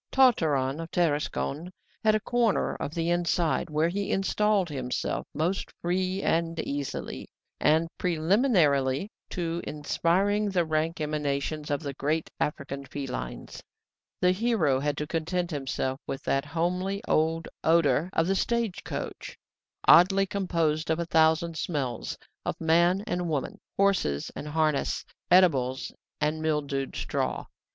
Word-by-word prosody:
Tartarin 155 - +3
of 165 0 -5
Tarascon 155 0 -1 0.3
had 215 -1 +4
a - - +2
corner 235 0 +1
of 150 - -5
the 165 0 0
inside, 175 -1 +1
where 155 +2 +1
he 200 +3 -2
installed 200 0 +2
himself 130 -5 -3
most 170 +6 -1
free 185 +2 -1
and 165 0 0
easily: 140 -1 -4 0.3
and, 160 +2 +3
preliminarily 165 - +2 0.2
to 170 -2 -2
inspiring 190 +7 +1
the 180 -3 +1
rank 160 +1 -1
emanations 150 0 -2
of 145 +1 0
the 140 -1 -4
great 155 +4 -1
African 140 -1 -3
felines, 125 - -6 0.6
the 180 - +4
hero 185 - +2
had 145 +1 -1
to 150 - -2
content 175 +3 -2
himself 135 -2 -2
with 135 - -4
that 135 +1 0
homely 180 +6 -1
old 160 +1 +1 0.2
odour 160 -1 +3
of 165 - +2
the 190 - +2
stage 230 0 -1
coach, - - -6 0.5
oddly 195 +3 +7
composed 165 -5 0
of 160 - +2
a 170 - -2
thousand 160 0 +3
smells, 135 -8 -3 0.3
of - - -3
man 170 +4 +3
and 175 -3 -2
woman, 145 -4 -2 0.2
horses 190 - +1
and 150 - -6
harness, 155 -1 0 0.3
eatables 135 -8 +4 0.3
and 155 +1 0
mildewed 145 -3 -1
straw. - - -2
165 Hz, 130 wpm, -27 LUFS, 145-180 Hz, 0.6 s, oddly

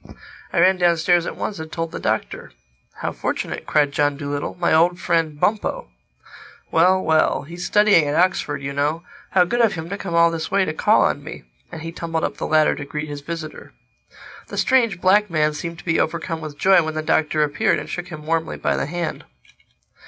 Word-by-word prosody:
I - - 0
ran 185 +2 +5
downstairs 175 0 +2
at - - -5
once 200 - -4
and 160 0 -7
told 165 -1 -3
the - - -6
Doctor. - - -3 0.5
"How - - -2
fortunate!" - - -4
cried 145 -2 +2
John 145 0 +1
Dolittle. 145 +2 -4
"My 170 - +2
old 175 +3 +3
friend 165 -4 0
Bumpo! 205 - -1 0.8
Well, 180 +3 +4
well!—He's 160 +2 0
studying 210 -6 +4
at 145 - -1
Oxford, 165 -5 +1
you 140 0 -4
know. 150 +4 -1 0.3
How 185 - +6
good 240 +6 0
of 225 -3 +3
him 160 0 -6
to 200 +1 -5
come 175 -3 -4
all 170 0 +5
this 160 -1 -4
way 195 0 +2
to 155 - -3
call - - +3
on - - 0
me!" - - -9 0.3
And 160 - -8
he 165 - -5
tumbled 165 -1 -3
up - - -2
the - - -3
ladder 155 -1 +3
to - - -6
greet 150 +2 -5
his 145 -1 -6
visitor. 155 0 -7 0.7
The - - -8
strange 230 -8 +2
black 200 +3 +3
man 155 -2 +1
seemed 170 +3 -6
to - - -13
be 165 -2 +1
overcome 165 0 -2
with 155 -2 -8
joy 190 +1 +5
when 160 -1 -4
the 155 - -2
Doctor 155 -1 +1
appeared 145 -1 +1
and - - -6
shook 175 0 -5
him 155 -3 -9
warmly 165 0 -1
by - - 0
the - - -2
hand. 170 +1 -4
165 Hz, 205 wpm, -21 LUFS, 155-175 Hz, 0.8 s, How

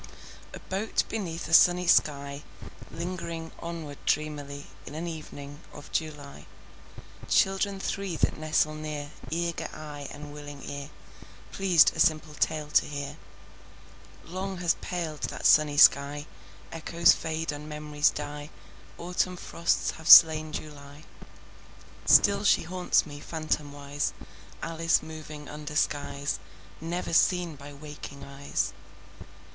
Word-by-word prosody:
A - - -8
boat 195 +4 -1
beneath 175 -7 -4
a 165 - -5
sunny 180 +1 +6
sky, 140 -4 +2 0.5
Lingering 170 -2 -5
onward 165 -4 -7
dreamily 145 -1 -2 0.2
In 145 - -8
an 165 +2 -4
evening 150 -3 -8
of 145 - -12
July— 145 - -5 0.8
Children 195 +1 +2
three 195 -2 -3
that - - +1
nestle 155 0 +1
near, 150 -1 -6 0.2
Eager 170 +1 -2
eye 145 -2 -8
and 145 0 -9
willing 145 -1 -9
ear, 140 0 -6 0.6
Pleased 185 -5 +4
a - - -7
simple 155 -1 +2
tale 150 0 -1
to - - +4
hear— 145 0 -5 1.1
Long 190 +2 -5
has 175 -1 +2
paled 165 -4 -4
that - - -7
sunny 150 -1 +5
sky: 145 +1 +5 0.5
Echoes 170 +1 +3
fade 160 -1 -3
and 150 +1 -8
memories 150 0 +1
die. 145 0 -6 0.5
Autumn 180 +1 -1
frosts 170 -1 0
have 160 +1 -7
slain 155 -1 +9
July. 145 -1 -9 1.0
Still 200 0 +6
she 205 - +4
haunts 180 +2 +1
me, 145 -2 -9
phantomwise, 145 -2 -3 0.5
Alice 165 0 +1
moving 155 -2 -9
under 150 0 -7
skies 145 -1 -1 0.4
Never 170 +1 -3
seen 175 -1 +3
by 140 +1 -11
waking 145 -1 -10
eyes. 140 0 -3
155 Hz, 120 wpm, -28 LUFS, 145-170 Hz, 1.1 s, slain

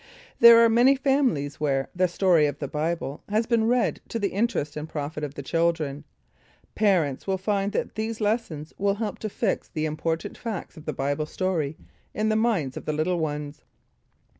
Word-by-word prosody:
There 235 0 +10
are - - +6
many 240 +4 +5
families 260 - +1
where 135 -3 0
"The 185 +1 +3
Story 175 -4 +3
of 145 - -4
the 140 - -4
Bible" 150 -1 -3
has 215 +2 +1
been 230 -1 +2
read 245 +1 +1
to - - -2
the 205 -3 0
interest 200 -8 -1
and 155 +1 -5
profit 150 +1 -4
of 145 -1 -5
the 140 - -6
children. 155 -2 -1 0.7
Parents 180 -11 +1
will 190 -1 +1
find 200 +1 -1
that - - -2
these 220 +1 -3
lessons 205 -9 -2
will 200 0 +2
help 210 -1 -4
to 215 - -3
fix 210 0 -1
the 155 -1 -2
important 160 +1 -3
facts 220 -7 -5
of 155 - -12
the - - -1
Bible 145 +3 -1
story 160 -5 -2 0.4
in 215 +1 +1
the 215 - +2
minds 215 - 0
of - - -7
the 155 - -1
little 170 +4 0
ones. 150 -1 -4
170 Hz, 190 wpm, -25 LUFS, 150-215 Hz, 0.7 s, There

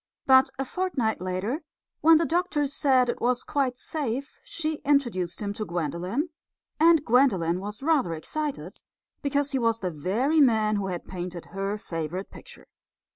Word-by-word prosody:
But 265 0 +6
a 270 - -2
fortnight 260 - -1
later, 185 - -2 0.4
when 325 +1 +7
the 330 - +1
doctor 330 -3 0
said 270 -3 +3
that - - +2
it - - -20
was 245 +1 +1
quite 265 -4 -1
safe, 275 - -4
she 315 -8 -3
introduced 240 -13 0
him 200 0 -2
to 215 - -4
Gwendolen; 180 - -2 0.5
and 325 -2 +5
Gwendolen 195 -9 +3
was 205 +5 -6
rather 285 - +2
excited, 295 - -5 0.4
because 285 -1 0
he 270 - 0
was 230 -1 +1
the 185 -4 -2
very 215 - +1
man 220 -5 +3
who 195 -1 -2
had 180 -2 -4
painted 180 -2 -6
her 195 +1 -2
favourite 170 0 -5
picture. - - -13
245 Hz, 160 wpm, -26 LUFS, 185-285 Hz, 0.5 s, when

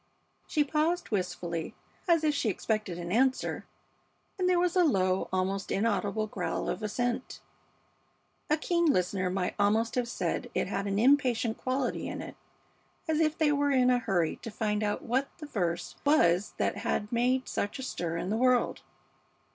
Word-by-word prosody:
She 300 - +2
paused 310 +3 0
wistfully, 175 -4 -3 0.3
as 335 -2 +4
if 305 -1 +3
she 265 -6 0
expected 215 -2 -2
an 175 0 -5
answer, 260 +5 +1 0.7
and 365 0 +2
there 360 - +4
was 355 0 +1
a 365 - +5
low, 190 - +1
almost 190 +1 -1
inaudible 210 0 0
growl 215 - -3
of - - -3
assent; 245 +4 -2 1.1
a 305 - +3
keen 340 +2 +1
listener 185 - +1
might 180 -1 -1
almost 220 +3 +2
have 250 -1 0
said - - -2
it - - +1
had 200 - -3
an 200 0 -1
impatient 245 -2 +3
quality 255 0 -1
in - - -5
it, - - -8 0.7
as 315 -1 +1
if 310 -1 +2
they 305 -2 +3
were 285 0 +2
in 255 -2 +4
a 250 - +3
hurry 185 -8 0
to 230 - -8
find 210 -1 -1
out 210 -1 -1
what 260 +4 0
the 315 - -8
verse 175 - -2
was 200 - +3
that - - 0
had 210 - -2
made 250 +2 +1
such 205 - -2
a 265 - -6
stir 170 -9 -3
in 180 +3 -3
the 220 - +1
world. 255 0 +2
230 Hz, 170 wpm, -29 LUFS, 195-280 Hz, 1.1 s, a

